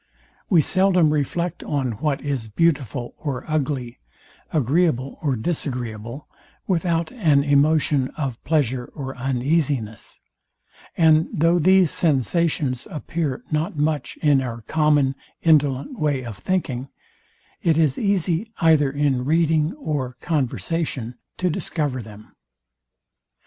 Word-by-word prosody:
We 175 -5 +5
seldom 185 -4 +3
reflect 170 +4 -2
on 135 -4 -1
what 140 +6 -2
is 135 -6 -3
beautiful 130 -3 0
or 140 -5 -4
ugly, 140 -6 -2 0.5
agreeable 145 -1 +1
or 140 -4 0
disagreeable, 120 -3 -4 0.4
without 170 -2 0
an 155 - +3
emotion 145 -1 +3
of 135 -6 -4
pleasure 130 -6 0
or 135 -2 -5
uneasiness; 130 -3 -1 0.8
and 160 -1 +4
though 170 -1 +3
these 185 0 +4
sensations 145 - 0
appear 155 -4 -3
not 155 +1 -1
much 150 0 -1
in 145 -3 +4
our 120 -3 -5
common 150 0 +2 0.3
indolent 150 - +2
way 140 -4 0
of 115 -3 -6
thinking, 135 -9 -2 0.7
it 165 -2 +2
is 155 -5 +2
easy, 200 0 0
either 155 -4 +4
in 140 -2 0
reading 160 +1 +2
or 140 - -3
conversation, 145 -4 -2 0.2
to 185 - 0
discover 145 -5 -2
them. 105 -1 -13
150 Hz, 115 wpm, -22 LUFS, 130-165 Hz, 0.8 s, We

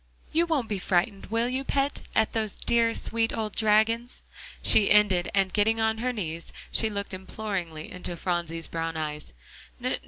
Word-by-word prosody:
You 335 +2 +2
won't 290 -8 0
be 205 -3 -2
frightened, 190 +2 0
will 230 +3 0
you, 260 +2 -2
pet, 275 +1 0
at 220 - +2
those 220 -3 -1
dear, 230 -1 +1
sweet 225 0 +1
old 215 -2 -3
dragons?" 225 +3 +1 0.4
she 205 -2 +6
ended, 195 -4 +4
and 195 -2 +2
getting 220 +2 +2
on 220 0 +1
her 250 +2 0
knees, 170 -8 -5 0.2
she 220 - +4
looked 200 -1 -4
imploringly 185 -5 -5
into 180 -1 -4
Phronsie's 170 -2 -1
brown 165 0 -3
eyes. 150 -1 -5
210 Hz, 160 wpm, -27 LUFS, 180-230 Hz, 0.4 s, she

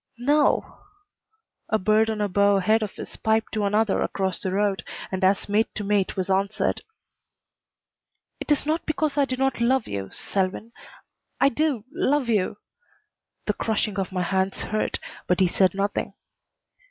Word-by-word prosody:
"No." 290 +5 +2 0.9
A 220 - +3
bird 215 +2 +3
on 215 -1 -2
a 205 - +2
bough 200 +1 +3
ahead 215 +4 +3
of 210 -3 -4
us - - -6
piped 220 0 0
to 215 -2 0
another 210 +1 +2
across 190 -3 -1
the 190 - -2
road, 195 -2 0 0.3
and 190 0 -3
as 190 +1 +3
mate 210 +2 +2
to 210 - -3
mate 200 -2 0
was 185 - -1
answered. 195 +2 0 1.6
"It - - -4
is 295 - +2
not 315 +3 -1
because 310 -2 0
I 285 -1 +3
do 255 - -3
not 270 -2 0
love 255 +1 +2
you 100 -1 -4
Selwyn. 195 +4 -2 0.7
I 275 - +5
do 280 -5 -1
love 280 -3 +1
you." 205 -3 +1 0.9
The 210 - +1
crushing 210 -1 -1
of 195 0 -2
my 180 -1 -1
hands 190 +1 0
hurt, 215 0 -1 0.3
but 180 - +2
he 190 - +5
said 185 +1 +2
nothing. 200 +1 -2
210 Hz, 165 wpm, -25 LUFS, 195-230 Hz, 1.6 s, I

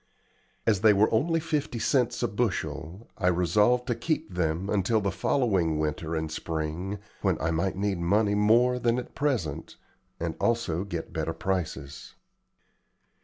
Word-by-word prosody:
As 105 -4 +2
they 110 -1 +7
were 105 +3 +3
only 165 +9 +2
fifty 155 -6 -2
cents 125 0 +1
a - - +3
bushel, 100 -3 -3
I 90 - +1
resolved 105 +8 +3
to 120 - 0
keep 150 - -2
them 85 +1 -1
until 105 +2 +2
the 100 -2 -1
following 95 - +1
winter 80 +1 -2
and 80 -1 -2
spring, 80 +5 -3 0.2
when 95 -5 +1
I 80 - 0
might 85 +4 0
need 100 -1 -1
money 100 +4 +2
more 115 +5 +4
than 120 0 +1
at 125 - -5
present, 95 - -2 0.4
and - - -2
also 110 -7 0
get 85 -4 -5
better 80 0 -2
prices. 80 -5 -4
100 Hz, 150 wpm, -27 LUFS, 85-115 Hz, 0.4 s, they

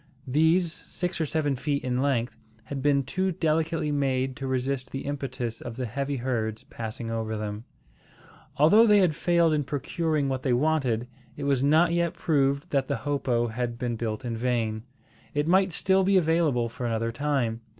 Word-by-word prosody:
These, 160 +5 +3
six 175 -1 -4
or 160 - 0
seven 145 -2 0
feet 140 +2 -2
in 125 0 0
length, 130 -4 0 0.3
had 135 +4 -5
been 140 0 +3
too 185 +8 -1
delicately 160 -1 0
made 135 -2 0
to 135 - -4
resist 130 0 -2
the 135 - -5
impetus 130 -5 -4
of 120 -1 -6
the 130 0 -3
heavy 140 +4 -3
herds 115 -4 -2
passing 115 0 -6
over 110 -1 -2
them. 105 +1 -5 0.9
Although 205 +11 +6
they 210 -1 +6
had 180 -5 +4
failed 170 0 +2
in 150 -1 +1
procuring 150 +1 -1
what 130 -1 -2
they 130 -2 +1
wanted, 125 -4 +1 0.3
it 145 - -5
was 140 -2 +1
not 160 +5 +4
yet 170 -1 0
proved 140 -2 +1
that 135 -2 +1
the 140 - -1
hopo 125 -5 0
had 120 +1 -3
been 120 -1 -2
built 110 +1 -4
in 115 -1 -2
vain. 115 -2 -1 0.5
It 145 +1 +1
might 190 +2 +4
still 190 +3 +2
be 195 +1 +4
available 160 -8 +2
for 120 +2 -5
another 115 0 -1
time. 120 -3 -1
135 Hz, 180 wpm, -27 LUFS, 120-155 Hz, 0.9 s, Although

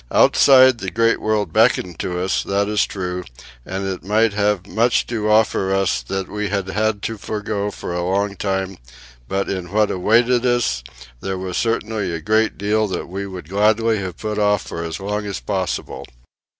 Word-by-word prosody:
Outside 130 -3 +6
the 95 - -3
great 115 +4 +2
world 110 -1 0
beckoned 110 -6 +2
to 90 -1 -2
us, 95 +1 0
that 100 +1 0
is 105 0 +1
true; 90 -2 -4 0.4
and 95 +6 -4
it 95 -1 -4
might 110 +2 +2
have 100 -2 0
much 115 +6 +1
to 110 -3 -2
offer 105 -3 +3
us 95 -10 +1
that 95 +10 -4
we 105 -1 -3
had 100 -1 -2
had 105 +1 0
to 115 -2 -3
forego 105 -1 -3
for 90 - -6
a 90 - -1
long 100 +2 0
time; 95 -1 -2 0.5
but 100 0 -1
in 90 -2 -4
what 105 0 +2
awaited 115 +6 +3
us 120 - +1 0.4
there 95 +4 -3
was 90 -1 -5
certainly 110 -4 -1
a 85 - -3
great 110 +5 +1
deal 105 +2 +1
that 95 - -4
we 100 +2 -4
would 90 -5 -8
gladly 110 +3 +2
have 95 -3 -5
put 105 -1 -3
off 105 -1 +2
for 85 - -6
as 80 +2 -5
long 105 +1 -3
as 100 - -4
possible. - - -3
100 Hz, 185 wpm, -20 LUFS, 95-110 Hz, 0.5 s, Outside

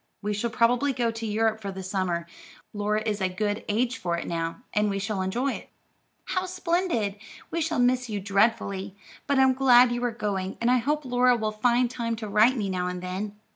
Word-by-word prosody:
"We 210 +1 -1
shall 210 +4 -1
probably 245 +5 +2
go 240 -2 0
to 225 0 -5
Europe 220 +1 0
for 200 -1 -4
the 190 0 -7
summer. 185 -3 -1 0.5
Laura 210 +1 0
is 210 -2 -1
a 190 - +1
good 205 +3 -2
age 235 +4 0
for 170 -2 -1
it - - -4
now, 165 +6 -3
and 210 -1 +2
we 195 - -1
shall 200 +1 -2
all - - -1
enjoy 240 +9 0
it." - - -9 0.6
"How 370 0 -1
splendid! 340 - -1 0.3
We 335 - -1
shall 320 - -1
miss 250 0 +2
you 210 -2 -2
dreadfully, 200 -1 0 0.3
but 280 - +2
I'm 265 -1 +5
glad 250 -2 +6
you 240 0 -2
are 245 - +2
going, 200 -4 -3
and 235 +1 +2
I 255 - +5
hope 295 +4 -1
Laura 250 0 +3
will 215 -1 -1
find 240 +3 +2
time 235 -1 -3
to 220 -1 -6
write 215 +6 +4
me 205 -3 -1
now 180 -1 -1
and 180 0 -4
then. 200 +3 -5
220 Hz, 215 wpm, -26 LUFS, 200-245 Hz, 0.6 s, glad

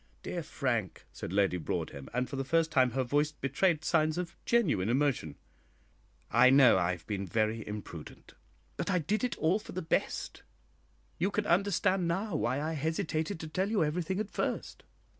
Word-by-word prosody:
"Dear 175 - -3
Frank," 120 - -2
said - - -6
Lady 95 -2 +2
Broadhem, 70 -4 -4
and 125 +1 -1
for 135 - -6
the 135 - -1
first 165 +3 +1
time 130 -3 +4
her 130 0 +1
voice 145 +4 +1
betrayed 155 +3 0
signs 155 -1 +2
of 180 -1 -4
genuine 155 - +2
emotion, 125 - +1 1.0
"I 130 - +6
know 130 -7 +7
I 90 0 +1
have 90 - -10
been 100 -2 -3
very 110 +3 0
imprudent, 105 -7 -8 0.4
but - - -2
I 185 - +3
did 200 - -1
it 250 - -1
all 170 +6 +2
for - - -10
the 185 - -3
best. 160 - -1 0.8
You 185 +4 +2
can 205 0 -1
understand 190 -1 +2
now 190 +2 -1
why 140 -2 0
I 155 +2 -2
hesitated 160 +3 -2
to 160 - -5
tell 185 +5 -1
you 215 -6 +2
everything 180 +5 -1
at 215 -1 -3
first. - - -3
155 Hz, 180 wpm, -31 LUFS, 120-180 Hz, 1.0 s, know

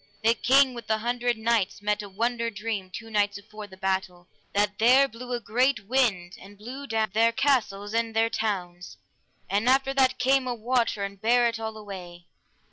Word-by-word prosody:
The 225 +1 +5
King 260 +3 +4
with 235 -1 -9
the 220 - +1
Hundred 240 +1 -1
Knights 220 -3 0
met 210 0 -1
a 205 - -9
wonder 230 +3 -1
dream 210 -3 -4
two 225 +4 -9
nights 205 -1 +1
afore 210 +1 -10
the 190 -1 -14
battle, 190 -2 -2 0.2
that 205 0 0
there 255 +5 +6
blew 245 +1 -10
a 245 - -1
great 235 0 0
wind, 200 -7 0
and 200 +1 -14
blew 260 +7 -8
down 220 -4 0
their 225 +2 +4
castles 225 -6 0
and 230 -1 -1
their 225 0 +3
towns, 180 - -4 0.5
and 205 +5 +1
after 270 +1 +3
that 260 -1 +2
came 260 +1 +2
a 245 - -2
water 235 -2 0
and 200 0 -6
bare 240 +2 +4
it 230 -1 -3
all 220 -1 -5
away. 180 -4 -9
225 Hz, 190 wpm, -26 LUFS, 200-245 Hz, 0.5 s, there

